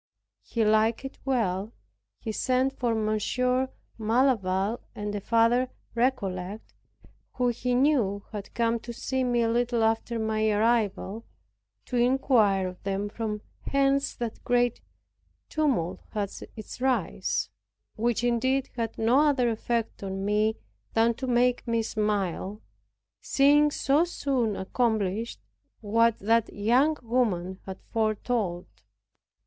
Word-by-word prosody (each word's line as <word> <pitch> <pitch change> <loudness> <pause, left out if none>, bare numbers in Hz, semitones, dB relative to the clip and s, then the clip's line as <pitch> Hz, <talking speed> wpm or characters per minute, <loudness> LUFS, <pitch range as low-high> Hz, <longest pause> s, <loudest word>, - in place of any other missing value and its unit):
He 230 -2 -1
liked 220 +4 +2
it 270 - -8
well. 220 -5 0 0.4
He 225 - -5
sent 255 +4 +1
for 240 -4 0
Monsieur 250 +4 0 0.3
Malaval 220 -3 +1 0.2
and 205 0 -4
a 205 - -3
father 230 +4 +3 0.2
Recollect, 205 -5 -2 0.6
who 250 -1 +1
he 245 +1 -1
knew 245 -8 +2
had 205 -2 -7
come 230 0 +1
to 235 +1 -8
see 260 +2 -2
me 240 -1 +2
a - - +2
little 235 0 +1
after 225 +1 0
my 220 -1 +1
arrival, 215 -1 +1 0.6
to 250 - -2
inquire 240 -6 +3
of 180 0 -9
them 200 +1 -2
from 210 -1 -4 0.3
whence 275 0 +2
that 235 -2 -5
great 245 -1 +1 0.7
tumult 255 - 0
had 205 -3 -2 0.2
its 220 +2 -9
rise, 260 -1 0 0.4
which 235 +1 0
indeed 260 +3 +1
had 230 -2 -3
no 230 +4 +3
other 280 -5 +3
effect 230 0 -2
on 195 0 -4
me 210 +1 +2 0.4
than 230 +1 +4
to 260 +3 -5
make 245 0 +2
me 230 -1 +1
smile, 210 -2 -1 0.6
seeing 290 +2 +4
so 290 +1 +2
soon 265 - -1
accomplished 220 +1 -1 0.4
what 230 +1 +2
that 225 +2 +2
young 250 +9 +2
woman 200 -7 0
had 190 0 -6
foretold 215 -4 -1
me. 100 0 -34
230 Hz, 125 wpm, -27 LUFS, 210-250 Hz, 0.7 s, than